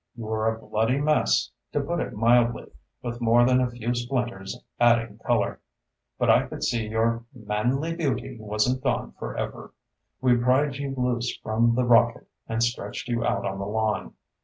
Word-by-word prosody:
You 115 - -7
were 110 0 0
a 110 - -6
bloody 115 +4 0
mess, 150 +1 +2 0.2
to 145 - +1
put 165 +5 -2
it - - -3
mildly, 120 +2 +2 0.3
with 120 0 -5
more 120 +1 +5
than 130 0 +4
a 125 - +1
few 120 0 -3
splinters 120 -6 -3 0.2
adding 115 -3 +3
color. - - 0 0.6
But - - +1
I - - +4
could - - -7
see 115 -2 0
your 115 +1 0
manly 125 +9 -1
beauty 155 -8 -2
wasn't 110 +5 0
gone 130 -2 -1
forever. - - -5 0.5
We 125 -2 +4
pried 130 +3 +2
you 140 -1 -4
loose 125 -1 -1
from 115 +2 +2
the 125 0 +2
rocket 120 0 +4 0.2
and 115 +1 +1
stretched 115 -1 -3
you 120 -1 0
out - - 0
on 95 0 -3
the 100 - -3
lawn. 110 0 -1
120 Hz, 170 wpm, -26 LUFS, 110-125 Hz, 0.6 s, more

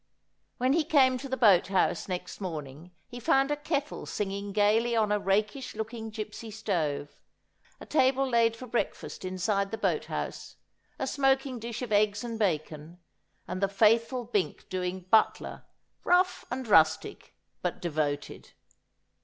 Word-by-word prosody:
When 255 +2 +2
he 325 +1 +3
came 265 -5 +4
to 275 - -7
the 260 - -2
boat 200 -8 +5
house 190 -1 +1
next 180 +2 -5
morning 155 -2 -6 0.2
he 245 -1 -8
found 270 +4 +2
a - - +2
kettle 295 0 -3
singing 200 0 -3
gaily 215 +4 +2
on 215 -2 +2
a 210 - +2
rakish 210 +7 -1
looking 220 +1 -5
gipsy 215 +1 -7
stove, 165 -10 -2 0.6
a - - -10
table 270 -2 +2
laid 230 -2 +3
for 255 - -9
breakfast 240 -4 -3
inside 190 +2 -1
the 225 - -4
boat - - 0
house, - - -5 0.4
a - - -2
smoking 270 -2 +1
dish 235 +2 -5
of 240 - -6
eggs 210 +1 +2
and 230 -2 -5
bacon, 155 -3 -2 0.5
and 185 +1 -4
the 195 - +3
faithful 230 +5 +3
Bink 210 -5 -2
doing 185 0 -3
butler, 220 - +2 0.4
rough 365 +1 +2
and 250 0 -4
rustic, 160 -6 +2 0.3
but - - -2
devoted. 150 -3 -3
220 Hz, 150 wpm, -29 LUFS, 190-250 Hz, 0.6 s, boat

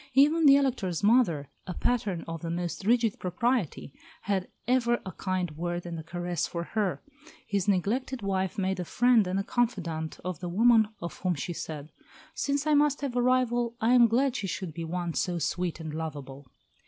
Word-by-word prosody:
Even 300 +3 +5
the 275 - +9
Elector's 240 - 0
mother, 200 - +3 0.2
a 180 - -4
pattern 210 -8 0
of 165 -1 -5
the 165 - -4
most 175 +2 -3
rigid 230 -1 +2
propriety, 185 - -1 0.3
had 190 -2 -1 0.2
ever 240 -1 +2
a 190 - -5
kind 185 -1 -2
word 175 +3 -4
and 170 -1 -5
a - - -7
caress 175 +1 -2
for 170 -1 -4
her; 205 0 -2 0.4
his 200 -2 -1
neglected 220 +6 0
wife 190 0 -1
made 190 -1 -1
a - - -1
friend 230 +2 +3
and 195 +2 -1
confidante 170 -10 -1
of 180 -4 -3
the 180 - -4
woman 225 +3 +5
of 170 - -6
whom 185 -2 0
she 175 +4 -4
said, 155 -2 -6 0.4
"Since 285 -1 -1
I 305 - +3
must 290 -1 +3
have 275 -4 -3
a 245 - +2
rival, 245 -2 +1
I 230 +2 +3
am 240 -2 +7
glad 255 +3 +1
she 195 - -3
should 180 -2 -4
be 165 +1 -5
one 175 0 -3
so 180 +1 -1
sweet 175 +1 -2
and 160 -2 -6
lovable." 145 -4 -6
190 Hz, 190 wpm, -28 LUFS, 170-240 Hz, 0.4 s, the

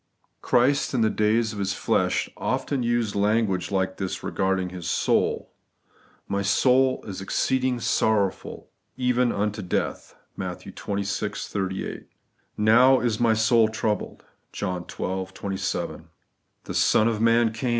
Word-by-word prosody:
Christ, 135 +3 +2
in 120 - +2
the 110 -1 +3
days 110 +1 +1
of 105 - -7
His 95 -1 -1
flesh, - - 0
often 130 +1 -2
used 120 -3 0
language 100 -3 +1
like 95 -1 -1
this 95 -1 -4
regarding 95 -1 -1
His 90 -2 -6
soul: - - 0 0.4
' - - -33
My 100 - 0
soul 130 +6 +3
is 95 -2 -6
exceeding 130 +5 0
sorrowful, 105 -4 0 0.3
even 125 -1 +2
unto 105 +1 -2
death' 90 - -3 0.2
(Matt. - - -5
xxvi. 100 +1 -4
38); 95 -1 -4 0.5
'Now 125 +5 +5
is 115 -3 -1
my 115 -2 +3
soul 110 0 +4
troubled' 110 -2 -3 0.3
(John 90 -3 -4
xii. 95 0 -3
27); 95 -1 -4 0.6
'The - - -6
Son 110 - +3
of 110 -2 -1
man 115 0 +3
came 120 +3 -2
110 Hz, 135 wpm, -25 LUFS, 100-120 Hz, 0.6 s, Now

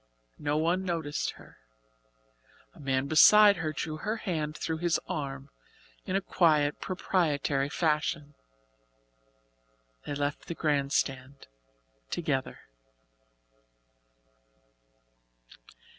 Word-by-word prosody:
No 150 0 -1
one 170 +4 +1
noticed 165 -5 -2
her. - - -17 1.1
A - - -18
man 135 -1 0
beside 200 +7 +7
her 160 -3 -2
drew 155 +1 -4
her 215 +7 -3
hand 155 -7 -3
through 160 -1 -3
his 175 -1 +1
arm 140 -1 -5 0.5
in 185 - -2
a 195 - +2
quiet 155 -6 +2
proprietary 150 -7 0
fashion. 150 -1 -1 1.7
They 145 - -3
left 145 0 -3
the 170 - -4
grand 145 -4 0
stand 135 0 -2 0.6
together. 145 -6 -2
150 Hz, 95 wpm, -29 LUFS, 145-170 Hz, 1.7 s, beside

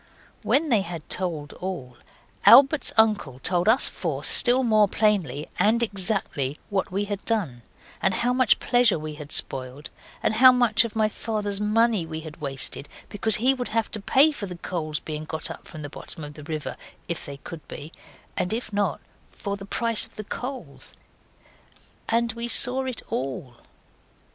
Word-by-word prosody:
When 305 +3 +1
they 225 -6 +3
had 170 -4 -7
told 160 -6 -2
all, 155 -10 -5 0.5
Albert's 275 +3 +7
uncle 210 - +3
told 175 +8 +1
us 245 +4 +6
four 150 -6 -4
still 250 +9 +5
more 215 -3 +4
plainly, 190 - 0
and 230 +3 +3
exactly, 190 - -1
what 195 -2 -1
we 200 +2 -1
had 205 -1 -5
done, 180 - -2 0.4
and 190 -1 +1
how 245 +4 +1
much 255 -3 +4
pleasure 245 -6 +3
we 155 0 -6
had 150 0 -10
spoiled, 130 +3 -1 0.3
and - - +2
how 255 +4 +8
much 245 -3 +3
of 230 -2 -6
my 215 -1 +3
father's 210 -2 -2
money 215 -3 +2
we 160 0 -5
had 155 0 -11
wasted 140 0 -5 0.2
because 210 +1 +2
he 255 +4 +3
would 250 -2 -4
have 225 0 -1
to 215 - -3
pay 280 +9 +4
for 220 -9 -6
the 180 -1 -7
coals 155 -4 -3
being 155 0 -6
got 160 0 -3
up - - -11
from 155 -4 -9
the - - -4
bottom 155 - -8
of 145 0 -8
the 150 - -11
river, 150 -4 -5 0.3
if 170 - -3
they 140 -1 -7
could 160 +2 -10
be, 150 +3 -9 0.4
and 180 - -1
if 225 -2 -4
not, 205 0 0 0.3
for 200 -2 -5
the 195 0 -10
price 230 +1 +1
of 225 - -27
the 215 - -6
coals. 245 - -7 1.1
And 230 +1 +1
we 235 +1 -5
saw 250 +2 +2
it 255 -4 -4
ALL. 130 -2 -4
200 Hz, 175 wpm, -25 LUFS, 155-230 Hz, 1.1 s, how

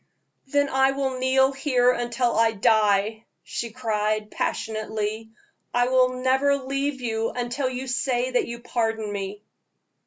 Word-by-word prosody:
"Then 285 +1 +2
I 265 0 +3
will 265 -2 -2
kneel 265 +1 +3
here 260 -3 +2
until 240 0 -1
I 225 0 +3
die," 215 +1 +2 0.2
she 235 - -4
cried, 215 -2 -1
passionately; 215 0 -3 0.5
"I 245 0 +3
will 255 0 +2
never 265 +2 +3
leave 275 0 -2
you 225 -2 -1
until 250 +2 -2
you 255 +1 -4
say 250 0 0
that 250 - +1
you 235 0 -7
pardon 225 -3 -1
me!" 200 +1 -5
245 Hz, 135 wpm, -24 LUFS, 220-260 Hz, 0.5 s, I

